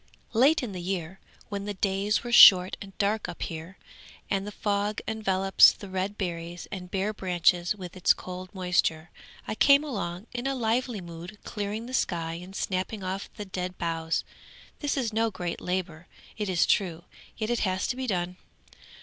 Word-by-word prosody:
'_] -, -, -37 dB, 0.3 s
'Late 270 Hz, +6 st, +4 dB
in 235 Hz, -, -4 dB
the 180 Hz, -2 st, -6 dB
year, 180 Hz, 0 st, -4 dB, 0.3 s
when 200 Hz, -1 st, -4 dB
the 205 Hz, 0 st, -4 dB
days 195 Hz, +2 st, 0 dB
were 240 Hz, -, -5 dB
short 185 Hz, -5 st, +9 dB
and 195 Hz, -1 st, -10 dB
dark 210 Hz, +1 st, 0 dB
up -, -, -5 dB
here, 165 Hz, +3 st, -7 dB, 0.5 s
and 195 Hz, 0 st, 0 dB
the -, -, -5 dB
fog 205 Hz, 0 st, -1 dB
envelops 195 Hz, -3 st, +5 dB
the 200 Hz, -, -10 dB
red 190 Hz, +2 st, -2 dB
berries 170 Hz, -2 st, -4 dB
and 180 Hz, -3 st, -6 dB
bare 195 Hz, +3 st, -1 dB
branches 180 Hz, -1 st, +2 dB
with 185 Hz, -3 st, -9 dB
its 185 Hz, -, +4 dB
cold 185 Hz, 0 st, -4 dB
moisture, 180 Hz, -4 st, 0 dB, 0.4 s
I -, -, -2 dB
came 280 Hz, +6 st, +5 dB
along 195 Hz, -, -4 dB
in 245 Hz, +2 st, -3 dB
a 275 Hz, -, 0 dB
lively 235 Hz, -2 st, 0 dB
mood 170 Hz, +3 st, -9 dB
clearing 210 Hz, +2 st, -4 dB
the 255 Hz, -, -8 dB
sky 165 Hz, -9 st, -1 dB
and 190 Hz, +2 st, -11 dB
snapping 190 Hz, +2 st, -2 dB
off 190 Hz, +1 st, -4 dB
the 210 Hz, -, -6 dB
dead 185 Hz, -1 st, -5 dB
boughs. 165 Hz, -1 st, -1 dB, 0.6 s
This 290 Hz, -1 st, -1 dB
is 235 Hz, -5 st, -1 dB
no 225 Hz, +1 st, +2 dB
great 175 Hz, -4 st, -5 dB
labour, 175 Hz, -3 st, -3 dB, 0.3 s
it 210 Hz, -2 st, -3 dB
is 180 Hz, -2 st, +3 dB
true, 175 Hz, -4 st, +1 dB, 0.3 s
yet 220 Hz, 0 st, -2 dB
it 240 Hz, -, +1 dB
has 185 Hz, -1 st, 0 dB
to -, -, -1 dB
be 260 Hz, 0 st, -4 dB
done. 180 Hz, -3 st, -2 dB
190 Hz, 185 wpm, -27 LUFS, 180-215 Hz, 0.6 s, short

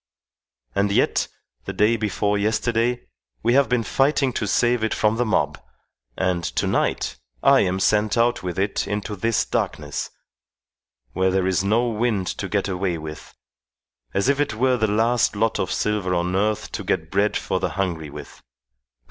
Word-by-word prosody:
And 100 Hz, 0 st, +1 dB
yet, -, -, +2 dB, 0.4 s
the -, -, -4 dB
day 105 Hz, +3 st, +3 dB
before 105 Hz, -1 st, 0 dB
yesterday, 115 Hz, +3 st, 0 dB, 0.4 s
we 120 Hz, +2 st, +3 dB
have 140 Hz, +1 st, +4 dB
been 125 Hz, -2 st, +1 dB
fighting 135 Hz, +3 st, +1 dB
to 105 Hz, -, -2 dB
save 120 Hz, +2 st, +2 dB
it 110 Hz, -, 0 dB
from 110 Hz, +1 st, +1 dB
the 125 Hz, -, +1 dB
mob, 110 Hz, -, 0 dB, 0.6 s
and 90 Hz, -2 st, 0 dB
to -, -, -1 dB
night -, -, 0 dB, 0.3 s
I 135 Hz, 0 st, +6 dB
am 95 Hz, 0 st, +1 dB
sent 105 Hz, +2 st, +2 dB
out 120 Hz, +1 st, +2 dB
with 90 Hz, -2 st, -4 dB
it 100 Hz, +1 st, -1 dB
into 105 Hz, +1 st, -3 dB
this 115 Hz, +3 st, +1 dB
darkness, -, -, -3 dB, 1.0 s
where 95 Hz, +1 st, +2 dB
there 95 Hz, 0 st, +1 dB
is 95 Hz, 0 st, +1 dB
no 115 Hz, +5 st, +2 dB
wind 110 Hz, -3 st, 0 dB
to 95 Hz, -, -3 dB
get 100 Hz, -2 st, 0 dB
away 90 Hz, -2 st, -1 dB
with; 75 Hz, 0 st, -9 dB, 0.8 s
as 100 Hz, +3 st, 0 dB
if 140 Hz, 0 st, +2 dB
it 145 Hz, -6 st, 0 dB
were 130 Hz, +3 st, +2 dB
the 110 Hz, -, +1 dB
last 115 Hz, +2 st, +2 dB
lot 110 Hz, +2 st, +1 dB
of -, -, -1 dB
silver 100 Hz, -4 st, 0 dB
on 90 Hz, +1 st, 0 dB
earth 105 Hz, +2 st, 0 dB
to -, -, -4 dB
get 80 Hz, -3 st, -2 dB
bread 100 Hz, +2 st, +2 dB
for 95 Hz, -, -2 dB
the 95 Hz, -, -1 dB
hungry 85 Hz, -6 st, -2 dB
with. 75 Hz, +1 st, -10 dB
105 Hz, 175 wpm, -23 LUFS, 95-115 Hz, 1.0 s, I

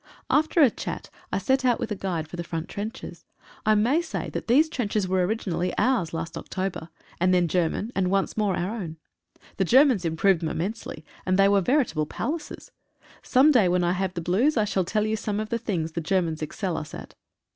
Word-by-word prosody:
After 315 Hz, +2 st, +3 dB
a 255 Hz, -, +5 dB
chat -, -, -6 dB, 0.2 s
I -, -, 0 dB
set 265 Hz, 0 st, +1 dB
out 245 Hz, -2 st, +2 dB
with -, -, -4 dB
a -, -, 0 dB
guide 175 Hz, -5 st, -3 dB
for 160 Hz, -, -8 dB
the 175 Hz, -, -4 dB
front 165 Hz, -1 st, -4 dB
trenches. 215 Hz, +5 st, -7 dB, 0.4 s
I 215 Hz, -, +5 dB
may 245 Hz, +10 st, +3 dB
say 345 Hz, -, -5 dB
that -, -, -5 dB
these 280 Hz, +7 st, +5 dB
trenches 215 Hz, -, -1 dB
were 185 Hz, 0 st, +1 dB
originally 185 Hz, -3 st, -1 dB
ours 240 Hz, -11 st, +1 dB
last 165 Hz, 0 st, -4 dB
October, 185 Hz, -3 st, -4 dB, 0.3 s
and 185 Hz, +1 st, +3 dB
then 175 Hz, -1 st, +3 dB
German, 180 Hz, +6 st, 0 dB
and 185 Hz, -2 st, +1 dB
once 195 Hz, 0 st, 0 dB
more 210 Hz, -4 st, +1 dB
our 180 Hz, +5 st, -2 dB
own. 165 Hz, -8 st, -6 dB, 0.6 s
The 195 Hz, -, +2 dB
Germans 255 Hz, -, +5 dB
improved 170 Hz, +2 st, +2 dB
them 160 Hz, -, -1 dB
immensely, 175 Hz, -3 st, -4 dB, 0.2 s
and 185 Hz, 0 st, +1 dB
they 195 Hz, 0 st, +6 dB
were 200 Hz, 0 st, +4 dB
veritable 190 Hz, -, +1 dB
palaces. 300 Hz, -, -5 dB, 0.5 s
Some 270 Hz, +4 st, +4 dB
day 220 Hz, -10 st, +4 dB
when 180 Hz, 0 st, +2 dB
I 175 Hz, -, +2 dB
have 185 Hz, 0 st, -2 dB
the 170 Hz, -, -2 dB
blues 230 Hz, -, +2 dB
I 215 Hz, -, +3 dB
shall 190 Hz, -3 st, 0 dB
tell 210 Hz, +3 st, 0 dB
you 215 Hz, 0 st, 0 dB
some 210 Hz, -1 st, -2 dB
of 215 Hz, 0 st, -4 dB
the 235 Hz, -, -1 dB
things 175 Hz, -8 st, -2 dB
the 170 Hz, -, -3 dB
Germans 165 Hz, -2 st, 0 dB
excel 170 Hz, +3 st, -3 dB
us 155 Hz, -, -6 dB
at. -, -, -10 dB
195 Hz, 210 wpm, -25 LUFS, 175-225 Hz, 0.6 s, they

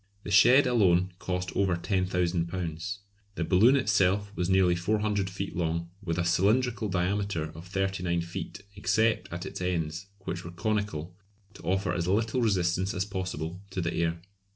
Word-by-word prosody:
The 105 Hz, -, -6 dB
shed 125 Hz, +7 st, +7 dB
alone 95 Hz, -7 st, +3 dB
cost 90 Hz, 0 st, -3 dB
over 95 Hz, -3 st, +2 dB
£10,000. 90 Hz, -1 st, -1 dB, 0.4 s
The 85 Hz, -, -1 dB
balloon 100 Hz, +10 st, +5 dB
itself 100 Hz, -4 st, +2 dB
was 90 Hz, 0 st, -1 dB
nearly 95 Hz, -2 st, +4 dB
400 105 Hz, +2 st, 0 dB
feet 95 Hz, +1 st, -5 dB
long, 85 Hz, 0 st, -2 dB
with 85 Hz, -4 st, -2 dB
a 85 Hz, -, 0 dB
cylindrical 110 Hz, +6 st, +2 dB
diameter 95 Hz, -3 st, -1 dB
of 80 Hz, +3 st, -10 dB
39 95 Hz, -2 st, -1 dB
feet, 85 Hz, +4 st, -6 dB
except 110 Hz, +2 st, +1 dB
at 90 Hz, +2 st, -5 dB
its 95 Hz, -, -6 dB
ends, 85 Hz, 0 st, -2 dB
which 90 Hz, -1 st, -4 dB
were 85 Hz, -, -7 dB
conical, 90 Hz, -3 st, -2 dB, 0.4 s
to -, -, -13 dB
offer 95 Hz, -1 st, 0 dB
as 85 Hz, 0 st, -1 dB
little 110 Hz, +6 st, +1 dB
resistance 95 Hz, -3 st, +1 dB
as 95 Hz, +1 st, 0 dB
possible 90 Hz, -3 st, -4 dB
to 95 Hz, -, -4 dB
the 85 Hz, -1 st, -1 dB
air. 85 Hz, 0 st, 0 dB
95 Hz, 155 wpm, -28 LUFS, 85-100 Hz, 0.4 s, shed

